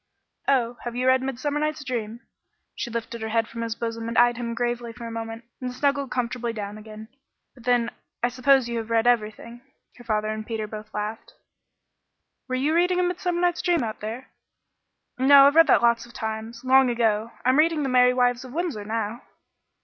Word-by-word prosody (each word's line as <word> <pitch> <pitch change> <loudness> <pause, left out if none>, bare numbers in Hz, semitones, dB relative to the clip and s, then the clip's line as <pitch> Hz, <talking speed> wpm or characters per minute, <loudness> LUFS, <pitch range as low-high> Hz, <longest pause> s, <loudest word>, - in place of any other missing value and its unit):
"Oh, 245 -3 +1
have 240 -1 -5
you 250 +1 -1
read 260 0 +4
'Midsummer 270 +3 -2
Night's 305 0 -2
Dream'?" 235 -3 -4 0.5
She - - -5
lifted 235 0 -5
her 220 - -3
head 225 0 +1
from 230 - -7
his 230 -1 -3
bosom 230 -1 -4
and 230 - -3
eyed 240 0 +5
him 235 -1 -4
gravely 240 -1 -2
a 230 -1 -6
moment, 225 0 -6 0.2
then 255 -1 -4
snuggled 280 +1 0
comfortably 240 -1 -2
down 210 -1 -6
again. 215 0 -10 0.5
"But 245 -3 -17
then, 240 -1 +2 0.3
I 240 - +3
suppose 260 0 +3
you 235 -1 -2
have 225 0 -7
read 225 0 +2
everything." 235 0 0 0.4
Her 245 - -13
father 215 -2 -1
and 215 0 -3
Peter 220 -1 -4
both 215 0 -9
laughed. 210 +1 -5 1.1
"Were 255 - -2
you 280 +5 +1
reading 360 +1 +2
'Midsummer 355 -1 -2
Night's 350 -1 +1
Dream' 345 -6 +1
out 220 -1 -4
there?" 225 +5 -6 0.9
"No, 275 +1 +8
I've 285 +2 +4
read 330 -1 +7
that 255 - +4
lots 235 0 +2
of 240 - -17
times 220 +2 -5
long 265 0 +5
ago. 225 -2 0
I'm 255 +3 +4
reading 315 -1 +3
'The 270 - -1
Merry 250 0 +4
Wives 245 0 +2
of 255 -1 -10
Windsor' 320 -10 -2
now." 225 +1 -3
240 Hz, 195 wpm, -25 LUFS, 225-265 Hz, 1.1 s, No